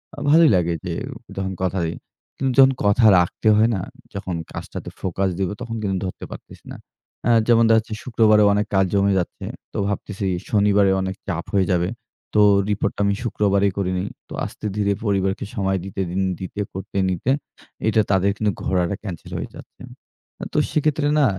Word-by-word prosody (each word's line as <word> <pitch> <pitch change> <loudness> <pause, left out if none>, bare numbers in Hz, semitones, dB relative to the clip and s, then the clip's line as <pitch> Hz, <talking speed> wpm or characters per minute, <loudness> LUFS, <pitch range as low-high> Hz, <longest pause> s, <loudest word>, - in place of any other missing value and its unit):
আ - - -26
ভালোই 160 +1 +7
লাগে 85 -1 +1
যে 90 - -2 0.4
যখন 95 0 -2
কথা 95 0 0
দেই। 80 +1 -3 0.4
কিন্তু 135 -1 0
যখন 135 0 +8
কথা 100 +3 +4
রাখতে 90 +5 -1
হয় 110 +2 +4
না? 95 - -2 0.3
যখন 95 -3 -4 0.2
কাজটাতে - - -7
ফোকাস 95 +1 -1
দিব, 95 -2 0
তখন 115 -2 -4
কিন্তু 95 -2 -1
ধরতে 95 - -6
পারতেসি - - -11
না। - - -7 0.5
আ - - +3 0.2
যেমন 115 -1 +5
দেখা 115 - +6
যাচ্ছে, 110 0 -7
শুক্রবারেও 110 -3 +4
অনেক 105 +1 +1
কাজ 95 0 +4
জমে 100 0 +3
যাচ্ছে। 90 - -5 0.3
তো - - -5
ভাবতেসি 100 -1 -3 0.2
শনিবারেও 100 -2 +3
অনেক 95 0 -3
চাপ 85 -4 -3
হয়ে 95 -2 +3
যাবে। 90 0 +1 0.4
তো 105 - +4 0.3
রিপোর্টটা 100 0 -1
আমি 100 0 +2
শুক্রবারেই 100 -3 +1
করে 95 -2 0
নিই। 95 +2 -2 0.2
তো - - -8
আস্তে-ধীরে 105 -1 -2
পরিবারকে 95 -1 0
সময় 95 -2 0
দিতে, 95 0 -7 0.2
ইন 95 - +1 0.2
দিতে 95 +2 -5
করতে, 95 +1 -6
নিতে, 95 +8 0 0.6
এটা 110 0 +4
তাদের 95 +1 +3
কিন্তু 105 -1 +1
ঘোড়াটা 90 +1 0
ক্যানসেল 90 -6 -7
হয়ে - - -5
যাচ্ছে। - - -14 0.7
তো - - -1
সেক্ষেত্রে 150 -1 +1
না? 145 - +5
100 Hz, 175 wpm, -22 LUFS, 95-110 Hz, 0.7 s, যখন